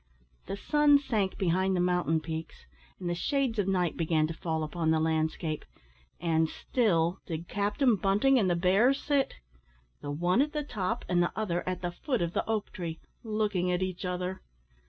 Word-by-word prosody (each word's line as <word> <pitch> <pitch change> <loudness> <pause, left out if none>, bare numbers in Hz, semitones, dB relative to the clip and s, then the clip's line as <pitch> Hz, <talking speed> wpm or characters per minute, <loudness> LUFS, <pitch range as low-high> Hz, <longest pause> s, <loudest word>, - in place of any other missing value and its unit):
The 195 - -4
sun 295 +5 +4
sank 220 -9 -1
behind 190 +1 +1
the - - +1
mountain 175 -3 +1
peaks, 160 0 -6 0.3
and 180 - -4
the 175 - 0
shades 255 - 0
of 200 - +1
night 180 -4 +1
began 160 -2 +2
to 160 - -3
fall 160 -1 -2
upon 160 +1 -1
the 160 0 +3
landscape, 160 0 -1 0.6
and 160 -2 +1
still 175 -8 +1
did 165 -1 -5
Captain 210 - +2
Bunting 210 +8 +3
and 195 -4 +2
the 175 - +2
bear 195 +9 +4
sit 280 -1 0 0.7
the 145 - -6
one 175 - +2
at 295 +1 0
the 300 -1 -1
top, 225 -3 -3
and 175 -1 +2
the 175 - +1
other 180 -5 -1
at 185 0 -4
the 175 - -1
foot 245 - -1
of 170 0 -3
the - - 0
oak 220 -2 -1
tree 165 -3 -5 0.2
looking 210 -5 0
at 180 +1 0
each 185 0 -4
other. 180 +1 -3
180 Hz, 185 wpm, -29 LUFS, 165-215 Hz, 0.7 s, sun